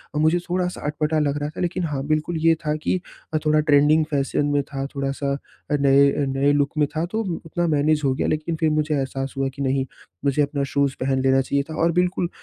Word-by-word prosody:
अ, - - 0
मुझे 160 +3 +3
थोड़ा-सा 180 0 -1
अटपटा 155 +1 0
लग 145 -1 0
रहा 145 - -2
था। 155 - -7
लेकिन 180 +1 -1
हाँ 145 -4 -3
बिल्कुल 155 +2 0
ये 165 0 +6
था 150 0 +1
कि 155 +4 -1 0.3
अ, 155 - +3
थोड़ा 155 0 +4
ट्रेंडिंग 150 +1 +4
फैशन 140 0 0
में 145 - +3
था 135 -1 -5
थोड़ा-सा 140 0 -2 0.3
नए 140 0 +4
नए 135 +1 +1
लुक 145 0 +1
में 150 -1 +3
था 160 +2 0
तो 220 - 0 0.2
उतना 175 +2 -1
मैनेज़ 150 +1 +2
हो 135 - +3
गया - - -1
लेकिन 155 +2 -1
फिर 160 - +2
मुझे 155 0 0
एहसास 135 -1 -3
हुआ 135 0 0
कि 140 - -6
नहीं, 135 0 +1 0.4
मुझे 140 +1 +2
अपना 140 -1 0
शूज़ 140 -1 +1
पहन 130 0 0
लेना 135 0 +4
चाहिए 140 +2 0
था 160 - -5
और 165 - +3
बिल्कुल 180 0 0
145 Hz, 220 wpm, -23 LUFS, 140-155 Hz, 0.4 s, ये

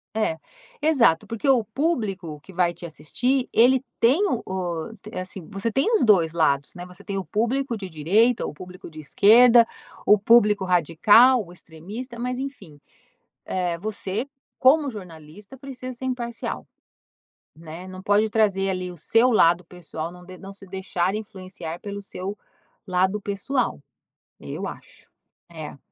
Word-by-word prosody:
É. 215 -7 0 0.4
Exato, 250 - +3
porque 230 +5 -2
o 250 -4 +4
público 210 - -2
que 190 - -15
vai 175 -1 +2
te 175 +1 -10
assistir 245 - -1
ele 255 +3 +4 0.2
tem 255 +8 +4
o 245 - -2
o 180 0 -4 0.2
é 185 - -4
assim 185 -2 -8
você 205 +3 -3
tem 270 - +1
os 410 - +3
2 175 -7 +4
lados, 140 -4 +1
né, 175 0 -8
você 180 +2 -13
tem 200 -1 -4
o 190 - -3
público 235 - -1
de 195 -4 -7
direita, 200 +10 +2
o - - -5
público 180 +4 -11
de 155 - -11
esquerda, 230 - +6 0.4
o 210 - +6
público 210 -2 +4
radical, 205 - +5
o 175 - -14
extremista. 195 +9 -9
Mas 250 +1 -2
enfim, 250 - -8 0.7
eh, 180 -2 -2
você 210 +4 -4 0.3
como 285 +2 +4
jornalista 190 - -11
precisa 255 -1 -8
ser 250 +2 -7
imparcial, 240 -2 -4 0.9
né? 165 +3 -10
Não 185 0 -9
pode 205 +2 +3
trazer 200 -3 +2
ali 185 -1 -3
o - - -12
seu 225 - +3
lado 175 -4 +4
pessoal, 165 -2 -7
não 180 0 -14
de 185 0 -12
não 195 0 -10
se 195 - -14
deixar 185 -1 -2
influenciar 185 -5 -8
pelo 200 0 -6
seu 195 +1 -6 0.5
lado 190 +3 +1
pessoal. 205 +7 -2 0.6
Eu - - -6
acho. - - -12 0.4
É. 155 -3 -8
195 Hz, 155 wpm, -24 LUFS, 175-235 Hz, 0.9 s, esquerda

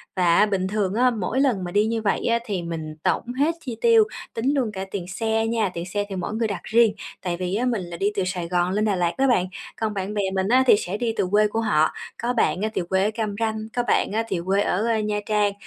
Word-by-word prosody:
Và 175 -3 +3
á 210 - +6
bình 195 -3 -1
thường 195 -1 -1
á, 250 +3 +4
mỗi 225 +1 -2
lần 240 -9 +1
mà 175 - -5
đi 205 +3 +3
như 225 0 -1
vậy 205 - 0
á 235 0 +2
thì 200 -6 -2
mình 160 -2 -5
tổng 245 - 0
hết 315 +4 +2
chi 245 -7 -6
tiêu, 455 -1 +6 0.3
tính 255 +5 0
luôn 250 -6 0
cả 190 -1 -4
tiền 185 -4 -4
xe 220 +3 0
nha, 225 -3 +1
tiền 170 0 -4
xe 205 +3 -2
thì 195 - -4
mỗi 185 +2 -3
người 225 0 0
đặt 200 -5 -5
riêng. 225 -1 +4 0.3
Tại 175 -1 -2
vì 180 +1 -2
á, 240 +4 0
mình 235 -5 0
là 175 -1 -7
đi 200 +4 +1
từ 195 - +1
Sài 180 -2 -3
Gòn 175 +1 +1
lên 210 +2 +1
Đà 205 -2 +1
Lạt 175 -1 0
đó 270 - +3
bạn, 235 -8 +3 0.4
còn 220 -1 0
bạn 195 +1 -3
bè 210 - 0
mình 190 0 0
á 255 +4 +5
thì - - +8
sẽ 195 0 -3
đi 230 0 -1
từ - - +1
quê 210 +1 +4
của 215 +2 -2
họ, 155 -8 +3 0.3
có 240 +1 0
bạn 220 -5 +1
á 215 - 0
thì - - 0
quê 190 0 +2
ở 210 - +1
Cam 215 -2 -2
Ranh, 220 -1 0 0.2
có 245 - +1
bạn - - +2
á 220 +2 0
thì 185 - -1
quê 195 +2 +2
ở 205 +1 0 0.2
Nha 210 -1 -1
Trang, 210 -1 +2
210 Hz, 280 wpm, -23 LUFS, 185-225 Hz, 0.4 s, thì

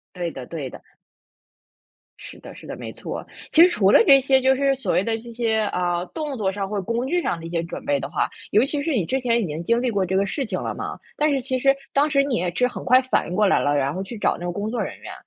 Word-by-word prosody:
对 175 -2 -3
的 130 -5 -8
对 145 -4 -6
的。 - - -12 1.4
是 - - -11
的 - - -11
是 - - -13
的， - - -6
没 - - -7
错。 - - -6 0.3
其 325 - +7
实 355 - +8
除 205 - +3
了 - - +8
这 275 +1 +7
些 265 0 +3
就 265 0 +4
是 275 0 +2
所 270 - -2
谓 185 - +2
的 225 +1 0
这 235 +1 -11
些， 225 -2 0
啊， 175 -1 -1
动 300 -4 -5
作 200 -5 0
上 195 0 -4
或 205 -1 -2
工 235 +6 -2
具 350 +5 0
上 170 - -1
的 165 - -8
一 - - -7
些 170 -1 -1
准 170 - -7
备 140 -1 +1
的 135 - -6
话， - - 0 0.2
尤 215 +4 +4
其 285 0 -2
是 320 - -2
你 225 - +1
之 265 0 -1
前 235 -1 +1
已 205 - -1
经 155 +1 -5
经 235 +6 +1
历 255 - 0
过 200 -3 0
这 185 +1 -1
个 195 +1 +2
事 275 +8 -2
情 200 -6 -3
了 - - -3
嘛， - - -6 0.2
但 300 +1 +2
是 275 -2 +1
其 260 0 -2
实 275 +1 +4 0.2
当 290 +2 +2
时 275 -1 +3
你 275 -3 -1
也 175 -4 -1
是 250 - +3
很 250 - -6
快 255 +1 +6
反 255 - 0
应 180 - -4
过 210 - +4
来 195 - +3
了， 145 0 +1
然 140 +1 0
后 190 - -3
去 215 +4 -8
找 - - +1
那 175 - -8
个 175 - -1
工 205 +4 -3
作 240 +2 -2
人 - - -6
员。 - - -9
225 Hz, 320 characters per minute, -23 LUFS, 180-265 Hz, 1.4 s, 实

